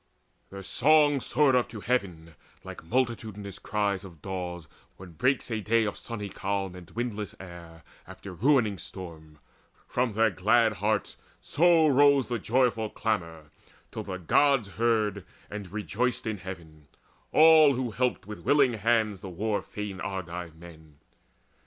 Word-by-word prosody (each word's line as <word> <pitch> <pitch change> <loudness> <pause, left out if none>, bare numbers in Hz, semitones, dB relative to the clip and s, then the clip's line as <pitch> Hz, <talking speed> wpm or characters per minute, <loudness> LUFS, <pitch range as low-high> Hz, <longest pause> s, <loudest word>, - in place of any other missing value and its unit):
Their 100 0 -9
song 145 +6 +3
soared 145 +1 +2
up 125 - +1
to 110 - -8
heaven, 90 -9 -2 0.3
Like - - -9
multitudinous 110 -3 -3
cries 100 -2 -1
of 85 -5 -12
daws, 90 -2 -6 0.3
when 90 -1 -12
breaks 125 - 0
A 110 -1 -2
day 115 +2 +2
of 105 - -3
sunny 105 -3 -6
calm 95 -1 -3
and 90 -2 -12
windless 110 -3 -4
air 85 -3 -12 0.2
After 95 +1 -10
a - - -9
ruining 110 - +2
storm: 80 -4 -10 0.5
from 125 -2 -1
their 110 +1 +3
glad 110 +4 +3
hearts 105 +2 -1 0.2
So 165 0 +3
rose 140 -2 +4
the 120 -2 -2
joyful 115 -1 +1
clamour, 85 -10 -3 0.4
till - - -5
the 95 - -6
Gods 120 - +2
Heard 110 -3 0 0.3
and 100 -3 -7
rejoiced 115 +4 -2
in 110 -3 -3
heaven, 85 -5 -10 0.4
all 155 -3 +7
who 125 -2 -2
had - - -15
helped 125 -5 0
With 105 +1 -8
willing 140 -4 +3
hands 110 -2 0
the 95 - -7
war 105 +4 -2
fain 105 -2 -7
Argive 90 -4 -5
men. 80 -3 -15
105 Hz, 150 wpm, -27 LUFS, 90-120 Hz, 0.5 s, all